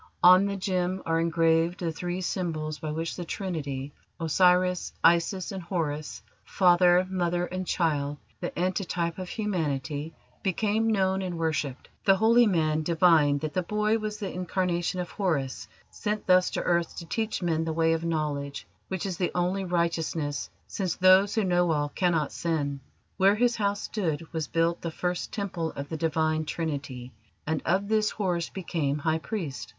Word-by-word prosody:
On 185 +2 +8
the 200 - -2
gem 185 -1 -1
are 165 0 +1
engraved 165 +1 +2
the 170 -2 -1
three 175 +3 -4
symbols 155 -4 -3
by 155 - -4
which 165 +2 -3
the 180 - -5
Trinity 145 -7 -4 0.3
Osiris, 180 +2 +2
Isis, 170 +2 +3
and 190 -1 -5
Horus; 160 -4 -3 0.2
Father: 180 -1 +4
Mother, 175 -1 0
and 185 0 -5
Child, 145 -4 0 0.2
the 175 - -3
antetype 175 -1 -1
of 185 -1 -5
Humanity 155 - -2 0.3
became 210 +3 +1
known 190 -2 +1
and 180 -2 -4
worshipped. 155 -5 -2 0.2
The 195 - +5
holy 230 +4 +5
man 155 -5 +1
divined 155 -3 +4
that 155 -1 -3
the 185 - +1
boy 210 +4 0
was 215 -1 -4
the 200 -3 -5
incarnation 180 0 -1
of 175 -3 -4
Horus 150 -10 -2 0.2
sent 210 -1 -3
thus 185 0 +5
to - - -1
earth 170 -1 0
to 170 - -6
teach 220 +1 -2
men 165 -2 +1
the 160 - -2
way 165 0 +2
of 165 0 -2
knowledge, 150 -4 -2 0.2
which 190 -1 -3
is 185 -3 -3
the 180 - 0
only 180 +2 0
righteousness, 165 -4 -1 0.2
since 185 -4 -2
those 185 +2 +5
who 220 - +2
know 175 -2 +2
all 145 -1 0
cannot 165 -3 0
sin. 145 -4 -2 0.4
Where 195 +2 +5
his 240 +2 +2
house 205 -1 0
stood 165 -6 -2
was 160 -2 -2
built 165 +1 0
the 170 - -3
first 180 +2 -3
Temple 180 -6 -3
of 140 0 -6
the 160 - -3
Divine 155 0 0
Trinity, 140 -6 -4 0.3
and 155 0 -1
of 190 +4 +1
this 215 0 +2
Horus 180 -5 -1
became 160 -6 -2
High 160 +1 0
Priest. 165 - -5
175 Hz, 165 wpm, -27 LUFS, 160-185 Hz, 0.4 s, On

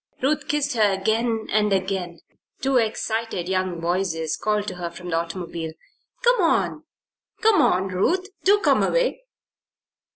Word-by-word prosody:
Ruth 290 +2 +1
kissed 290 -1 0
her 215 -3 +4
again 220 +3 0
and 210 0 +2
again. 190 -3 -2 0.4
Two 265 0 +2
excited 225 -4 -1
young 185 -2 -1
voices 170 -2 -1
called 210 -1 -1
to 185 - -8
her 175 -1 -4
from 180 +1 -9
the - - +1
automobile. 165 -1 -4 0.5
"Come 485 -3 +4
on! 335 - +1 0.6
Come 435 -3 +5
on, 190 +2 +2
Ruth. 335 - +1 0.2
Do 405 +2 +5
come - - +3
away!" - - +1
195 Hz, 140 wpm, -23 LUFS, 180-260 Hz, 0.6 s, Come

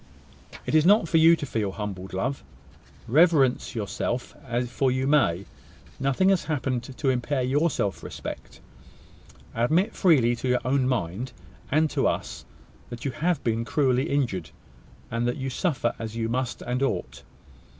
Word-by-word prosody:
"It - - -3
is 155 -1 +5
not 200 0 +5
for 165 - +2
you 165 +1 +7
to 155 - -5
feel 110 -7 -2
humbled, 95 -3 -6
love. 125 +9 -2 0.6
Reverence 140 -3 +3
yourself; 110 +3 -3 0.3
for 130 +2 0
you 130 +1 0
may. 115 - +2 0.5
Nothing 135 +8 +2
has 190 -5 +2
happened 135 -5 -1 0.2
to 140 - 0
impair 130 +2 -1
your 145 +6 +2
self 100 -8 -2
respect. - - -8 0.9
Admit 160 - +1
freely 130 - +4
to 130 - -4
your 125 0 +2
own 130 0 +2
mind, 120 +1 -2 0.4
and 155 +3 +3
to - - +1
us, - - -3 0.4
that 120 +1 -8
you 135 - 0
have 165 +3 -1
been 115 0 0
cruelly 130 +2 +1
injured, 105 - -1 0.6
and 115 +1 0
that 120 - -1
you 135 -1 -3
suffer 130 -4 0
as 110 -1 -5
you 115 -1 -1
must 125 +1 -2
and 125 +1 -2
ought. 70 - -2
130 Hz, 155 wpm, -26 LUFS, 115-150 Hz, 0.9 s, you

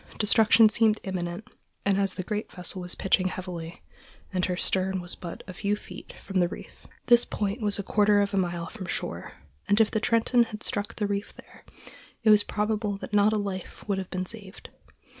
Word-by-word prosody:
Destruction 220 +1 +5
seemed 220 0 +3
imminent, 180 +1 -4 0.4
as 195 -1 +2
the 185 - -4
great 210 +3 -4
vessel 180 +1 -4
was 180 0 -3
pitching 185 -1 +2
heavily, 180 -3 -6 0.5
and 185 -1 +1
her 180 - -1
stern 190 0 0
was 175 0 -1
but 170 -2 -8
a 185 - -7
few 205 +3 -1
feet 210 - -11
from 195 -1 -1
the 175 - +3
reef. - - -11 0.2
This 240 -1 +7
point 205 +3 -3
was 205 -1 +2
a 200 - -3
quarter 205 +1 +3
of 200 0 0
a - - +1
mile 175 -2 -1
from 190 -3 -8
shore, - - -4 0.3
and 205 - +3
if 220 - +4
the 220 - +1
Trenton 230 +2 +3
had 215 -1 -9
struck 205 0 -3
the 210 - -1
reef 200 0 -3
there, - - -16 0.6
it 220 - +6
is 210 - +7
probable 210 -1 -1
that 200 - -9
not 205 +1 +5
a 215 - +1
life 195 -2 -5
would 200 -2 0
have 190 - -6
been 185 0 -3
saved. 200 -2 -11
200 Hz, 200 wpm, -27 LUFS, 185-215 Hz, 0.6 s, This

